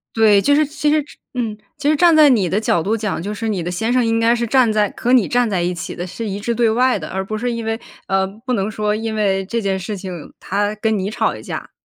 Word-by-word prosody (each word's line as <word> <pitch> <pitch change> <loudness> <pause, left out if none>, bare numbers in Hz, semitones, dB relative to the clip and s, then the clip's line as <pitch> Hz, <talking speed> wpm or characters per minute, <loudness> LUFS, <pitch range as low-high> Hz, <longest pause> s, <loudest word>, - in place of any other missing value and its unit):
对， 215 -3 +5
就 285 - +3
是 305 +1 +4
其 300 +1 -1
实 305 0 +3 0.3
嗯， 230 -4 -2 0.2
其 290 0 -1
实 305 - +4
站 340 +2 +5
在 310 -1 +7
你 225 -8 +3
的 195 +5 0
角 175 -6 +1
度 205 +6 0
讲， 210 -6 -2
就 205 +3 -4
是 225 +2 -4
你 200 -5 -1
的 175 - -3
先 220 +6 -2
生 250 0 +3
应 225 0 +1
该 230 +1 +3
是 235 0 -1
站 250 -1 +3
在 210 -1 +1
和 245 - 0
你 235 -7 +4
站 245 -1 +1
在 190 -4 0
一 175 +1 0
起 170 - -6
的， 175 - -4
是 220 +5 -5
一 195 0 -3
致 235 +3 -2
对 235 0 +2
外 250 +3 +2
的， - - -7
而 190 +1 -3
不 215 +2 -4
是 245 +2 -1
因 230 -1 -4
为， 225 +1 -2 0.3
呃， 195 0 +2
不 220 +6 -6
能 205 -3 0
说 210 -1 -1
因 220 +1 -3
为 195 -3 +1
这 230 +4 -2
件 195 -2 -1
事 195 +3 -5
情 185 -4 -8
他 205 +2 -1
跟 220 0 0
你 195 +1 -2
吵 215 - 0
一 - - -9
架。 - - -6
220 Hz, 305 characters per minute, -19 LUFS, 195-235 Hz, 0.3 s, 在